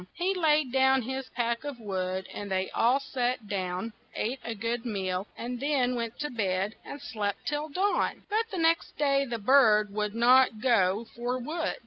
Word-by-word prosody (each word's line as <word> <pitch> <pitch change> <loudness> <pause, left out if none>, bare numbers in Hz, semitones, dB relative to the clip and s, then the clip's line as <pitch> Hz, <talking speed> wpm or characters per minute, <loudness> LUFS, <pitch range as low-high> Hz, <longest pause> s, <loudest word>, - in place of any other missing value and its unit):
He 365 +2 0
laid 305 -7 +2
down 265 0 +4
his 265 +2 -4
pack 235 -1 -1
of 285 -4 -6
wood, 190 -3 -3
and 205 -1 -6
they 190 0 -1
all 245 +4 +3
sat 250 -4 -2
down, 190 +2 -3 0.2
ate 250 +5 -2
a 230 - -4
good 230 +2 -2
meal, 190 -4 -2
and 245 +1 -4
then 270 -3 +1
went 235 -1 -3
to 295 - -2
bed 195 -3 -1
and 285 - -8
slept 210 -7 -4
till 295 +1 -2
dawn. 385 +7 0
But 450 +2 0
the 385 - -5
next 330 0 +1
day 275 -1 +2
the 240 -3 -3
bird 215 -3 +4
would 210 0 -2
not 245 -1 +5
go 215 -3 +2
for 245 +1 -2
wood. 315 +6 -2
240 Hz, 180 wpm, -28 LUFS, 210-275 Hz, 0.2 s, not